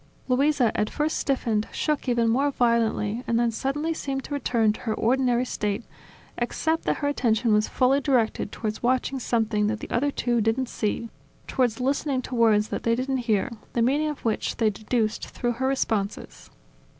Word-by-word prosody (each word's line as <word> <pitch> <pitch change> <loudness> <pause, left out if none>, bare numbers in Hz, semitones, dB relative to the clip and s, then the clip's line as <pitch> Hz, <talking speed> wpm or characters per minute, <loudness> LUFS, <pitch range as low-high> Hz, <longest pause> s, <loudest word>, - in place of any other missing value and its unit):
Luisa, 265 -1 +2
at 210 - 0
first 305 +1 -1
stiffened, 230 -6 0
shook 300 -3 -1
even 235 -1 +2
more 270 +6 +2
violently 235 -3 +1
and 230 0 +2
then 235 -1 +2
suddenly 290 +7 -1
seemed 270 -4 -3
to - - -6
return 235 -6 +2
to - - -10
her 220 -3 -2
ordinary 250 +1 +2
state; 210 -2 -2 0.6
except 320 +7 -1
that - - +1
her - - +3
attention 235 -5 +1
was 210 0 +3
fully 265 +2 +2
directed 245 -6 +1
towards 215 -1 -4
watching 255 +2 +1
something 220 -3 +1
that 220 0 -1
the - - -8
other 275 +5 +1
two 240 -4 0
didn't 230 +4 0
see, 225 +1 -2 0.3
towards 245 -4 0
listening 270 +1 0
to 255 - -7
words 220 -3 +3
that - - -3
they 230 0 +2
didn't 265 +2 -1
hear, 215 +4 +2 0.2
the 235 - +1
meaning 285 +5 +2
of 300 -4 -6
which 225 - -1
they 220 -2 +2
deduced 215 +1 -1
through 240 - -2
her 260 +3 -1
responses. 220 -7 -2
240 Hz, 180 wpm, -25 LUFS, 220-270 Hz, 0.6 s, her